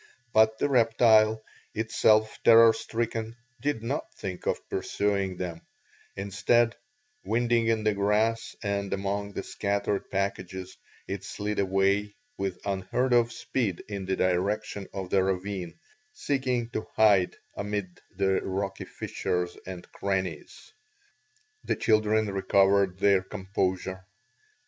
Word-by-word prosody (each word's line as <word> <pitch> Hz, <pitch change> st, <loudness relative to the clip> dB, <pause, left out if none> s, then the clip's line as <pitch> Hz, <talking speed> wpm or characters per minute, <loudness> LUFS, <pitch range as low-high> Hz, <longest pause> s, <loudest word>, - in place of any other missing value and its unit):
But 110 Hz, 0 st, +5 dB
the 145 Hz, -, +1 dB
reptile, 110 Hz, -3 st, +4 dB, 0.3 s
itself 110 Hz, 0 st, +2 dB
terror 115 Hz, 0 st, +8 dB
stricken, 115 Hz, 0 st, -3 dB, 0.3 s
did 140 Hz, -6 st, -1 dB
not 135 Hz, +6 st, -3 dB
think 95 Hz, -2 st, -6 dB
of -, -, -1 dB
pursuing 100 Hz, -2 st, -1 dB
them; 85 Hz, -2 st, -5 dB, 0.5 s
instead, 110 Hz, +4 st, +2 dB, 0.5 s
winding 120 Hz, 0 st, +1 dB
in 110 Hz, -1 st, +1 dB
the 110 Hz, -1 st, +2 dB
grass 105 Hz, +3 st, +1 dB
and 100 Hz, -1 st, -2 dB
among 100 Hz, +1 st, -2 dB
the -, -, -4 dB
scattered 100 Hz, 0 st, -2 dB
packages, 95 Hz, -1 st, -3 dB, 0.3 s
it -, -, -4 dB
slid 105 Hz, +1 st, -3 dB
away 100 Hz, +1 st, +1 dB, 0.2 s
with 95 Hz, -2 st, -3 dB
unheard 100 Hz, +6 st, 0 dB
of 120 Hz, -1 st, +4 dB
speed 110 Hz, -9 st, -2 dB
in 100 Hz, -2 st, -5 dB
the 95 Hz, -, +1 dB
direction 95 Hz, +2 st, -1 dB
of 95 Hz, -2 st, -6 dB
the 95 Hz, -1 st, +4 dB
ravine, 95 Hz, -2 st, -3 dB, 0.4 s
seeking 130 Hz, -, -1 dB
to 110 Hz, -, -4 dB
hide 100 Hz, -4 st, +4 dB, 0.2 s
amid 100 Hz, -3 st, -4 dB, 0.2 s
the 95 Hz, -1 st, +2 dB
rocky 95 Hz, 0 st, -3 dB
fissures 90 Hz, 0 st, -3 dB
and 90 Hz, -2 st, -7 dB
crannies. 95 Hz, -, -4 dB, 0.9 s
The -, -, 0 dB
children 110 Hz, 0 st, +2 dB
recovered 100 Hz, -1 st, +2 dB
their 100 Hz, -1 st, +4 dB
composure. 95 Hz, -1 st, -3 dB
100 Hz, 120 wpm, -28 LUFS, 95-110 Hz, 0.9 s, terror